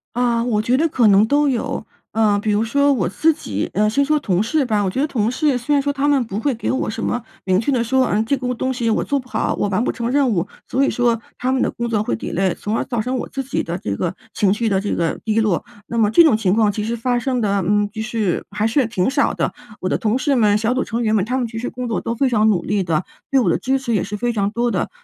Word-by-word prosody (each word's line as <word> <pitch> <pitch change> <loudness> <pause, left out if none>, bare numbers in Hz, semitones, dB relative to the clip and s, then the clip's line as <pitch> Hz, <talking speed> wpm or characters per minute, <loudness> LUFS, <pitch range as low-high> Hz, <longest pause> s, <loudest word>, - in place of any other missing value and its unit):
啊， 240 -1 +1
我 215 -4 +1
觉 240 +3 +1
得 325 +2 +2
可 245 -6 +3
能 200 +1 +6
都 290 +5 +2
有。 245 -4 -2 0.3
呃， 215 -2 +3
比 215 - 0
如 205 +1 +2
说 280 +5 +2
我 215 -11 +1
自 315 - +2
己 105 - -4
呃， 210 +3 +2
先 280 +6 +2
说 305 +2 +2
同 195 -7 0
事 290 +4 +1
吧。 210 -3 +1
我 190 - 0
觉 255 - -3
得 295 - +2
同 230 -5 0
事 290 -1 +1
虽 245 +4 -1
然 280 - +3
说 285 0 -1
他 285 +1 0
们 280 -3 +3
不 205 -2 -5
会 270 +4 0
给 230 - -4
我 260 - -1
什 220 +1 -5
么 245 0 -2 0.2
明 185 -1 +2
确 280 - 0
地 245 -3 +1
说， 260 +2 +2
嗯， 215 +2 +1
这 280 - +1
个 250 -2 -2
东 260 +2 -2
西 240 -2 -1
我 220 - +1
做 285 - 0
不 255 -2 -7
好， - - -1
我 205 - -1
完 195 +3 0
不 - - 0
成 235 0 -3
任 280 -2 +3
务， 180 -6 0 0.2
所 270 +2 +1
以 - - +2
说 235 -2 +1 0.2
他 255 +1 0
们 260 - +1
的 - - +1
工 235 -1 -4
作 215 -3 0
会 - - -2
delay， 185 - -1
从 210 +2 -3
而 - - 0
造 240 -3 -3
成 250 +4 -2
我 - - -5
自 270 - -4
己 270 - -2
的 170 +2 -4
这 100 - -3
个 175 - -2 0.2
情 200 -3 +2
绪 225 +2 -1
的 195 -2 +1
这 205 - -2
个 165 -1 -1
低 220 0 +1
落。 210 -6 +1 0.2
那 235 - -4
么 215 -2 +3
这 340 - +7
种 300 - +5
情 205 -4 +1
况 215 -1 +3
其 210 +1 -2
实 235 +2 -2
发 245 +1 0
生 255 +1 -1
的 200 -3 +1
嗯， 205 +2 +2
就 220 - -4
是 220 -5 -1
还 210 +2 0
是 255 +2 +2
挺 205 -4 0
少 280 +1 +1
的。 - - -1 0.3
我 185 - -2
的 - - +1
同 220 +3 0
事 275 +1 +1
们、 210 -3 +4
小 225 +3 0
组 260 - 0
成 230 +1 -3
员 220 -1 +2
们， 200 - +2
他 250 +4 -1
们 245 -3 -1
其 225 - -8
实 245 - -3
工 250 0 -5
作 225 - -2
都 230 - -2
非 265 +4 +1
常 220 -3 +3
努 180 -5 +2
力 205 0 0
的， 170 0 -1 0.3
对 270 - +4
我 250 - +2
的 - - +2
支 265 +1 0
持 240 -3 -2
也 195 - +1
是 210 +1 -5
非 240 +2 -1
常 200 -2 0
多 240 +2 0
的。 - - -1
230 Hz, 335 characters per minute, -20 LUFS, 210-255 Hz, 0.3 s, 这